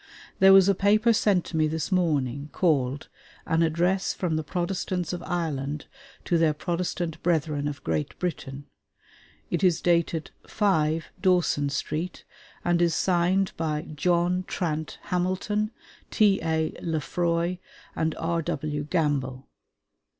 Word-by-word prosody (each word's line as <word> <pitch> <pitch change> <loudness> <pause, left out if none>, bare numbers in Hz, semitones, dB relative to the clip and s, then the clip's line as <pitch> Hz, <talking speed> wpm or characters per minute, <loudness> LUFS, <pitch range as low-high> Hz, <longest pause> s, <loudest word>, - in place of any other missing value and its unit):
There 190 0 +8
was 195 -1 +8
a 200 - +5
paper 215 +4 +3
sent 205 -6 +2
to 160 - -4
me 155 -1 +3
this 160 +3 -3
morning, 145 -6 0
called 140 -6 +1 0.4
'An 165 0 +1
Address 175 +4 +1
from 170 -4 -1
the 155 - -1
Protestants 180 +1 -2
of 175 - -4
Ireland 150 -5 -3 0.4
to 170 -3 +2
their 155 -2 +3
Protestant 175 0 -3
Brethren 155 -4 0
of 145 -2 -6
Great 80 -2 -2
Britain.' 140 -5 -4 0.9
It 170 0 -1
is 175 -4 +4
dated 170 -2 +1 0.2
"5, 160 -6 +1
Dawson 175 -6 +2
Street," 155 +5 -3 0.4
and 175 0 +2
is 170 -2 +3
signed 185 +2 +2
by 155 -2 -1
"John 175 +3 +1
Trant 160 -4 -3
Hamilton, 185 +4 -1 0.4
T.A. 160 -7 +2
Lefroy, 170 +2 -1 0.4
and 160 0 0
R.W. 155 -3 -2
Gamble." 140 -5 -1
170 Hz, 125 wpm, -26 LUFS, 150-180 Hz, 0.9 s, There